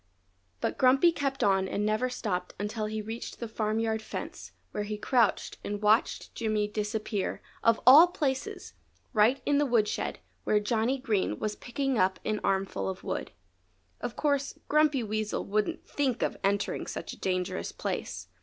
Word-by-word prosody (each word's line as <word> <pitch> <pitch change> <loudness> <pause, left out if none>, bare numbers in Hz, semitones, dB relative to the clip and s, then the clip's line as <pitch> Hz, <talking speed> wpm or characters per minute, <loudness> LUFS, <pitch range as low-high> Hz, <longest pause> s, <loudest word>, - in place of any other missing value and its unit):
But - - -2
Grumpy 265 +7 +6
kept 275 -4 -2
on 190 -1 +3
and 205 +2 -1
never 215 +4 +1
stopped 195 -8 -3
until 215 +1 -2
he 215 0 -3
reached 225 +2 -6
the 235 - -4
farmyard 220 0 -1
fence - - -7 0.2
where 210 - -3
he 210 0 -3
crouched 230 -1 +1
and 205 0 -3
watched 215 +2 +2
Jimmy 215 -2 0
disappear 210 -1 -2 0.2
of 230 0 +4
all 290 +8 +10
places! 275 -7 -3 0.4
right 225 +5 +4
in 285 0 +3
the 295 - +3
woodshed, 230 -4 +1 0.3
where 210 - +3
Johnny 225 +4 +1
Green 210 - 0
was 210 -1 -2
picking 270 -1 -2
up 185 0 +2
an 215 -1 0
armful 195 0 0
of 190 0 -6
wood. - - -3 0.7
Of - - -4
course 285 -2 0
Grumpy 300 -4 +3
Weasel 215 0 -2
wouldn't 215 - -1
think 260 -5 0
of - - 0
entering 200 +1 0
such - - -5
a - - -13
dangerous 180 - -2
place. 90 +2 -4
215 Hz, 160 wpm, -29 LUFS, 205-255 Hz, 0.7 s, all